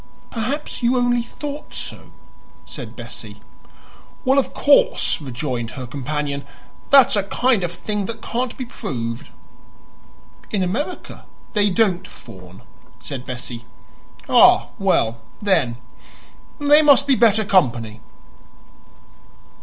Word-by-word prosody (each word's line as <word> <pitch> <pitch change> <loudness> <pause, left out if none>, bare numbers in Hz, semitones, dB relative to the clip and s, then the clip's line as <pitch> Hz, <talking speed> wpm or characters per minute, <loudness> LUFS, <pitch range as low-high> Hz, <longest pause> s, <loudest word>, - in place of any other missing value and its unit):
"Perhaps 255 +7 -3
you 245 +1 +2
only 245 -1 +2
thought 290 +5 -8
so," - - -7 0.5
said - - -8
Bessie. - - -9 0.9
"Well, 265 +2 +4
of 275 - -1
course," 290 - +3
rejoined 125 -3 -4
her 130 - -5
companion, 140 +2 -3 0.5
"that's 275 -5 +7
a 205 - +2
kind 225 +2 +1
of 175 - -2
thing 205 +2 -3
that 230 -1 -6
can't 245 +2 -3
be 255 - -4
proved." 115 - -5 1.2
"In 200 -3 0
America 270 - -4 0.3
they 205 -2 +2
don't 190 -2 +1
fawn," 95 -5 -14 0.4
said 130 -2 -7
Bessie. 125 -2 -7 0.6
"Ah, - - +6
well, 115 0 +1 0.2
then, 165 - +1 0.8
they 290 0 +5
must 285 -2 +5
be 280 - +3
better 220 -3 +4
company." 120 - +1
200 Hz, 115 wpm, -21 LUFS, -, 1.2 s, that's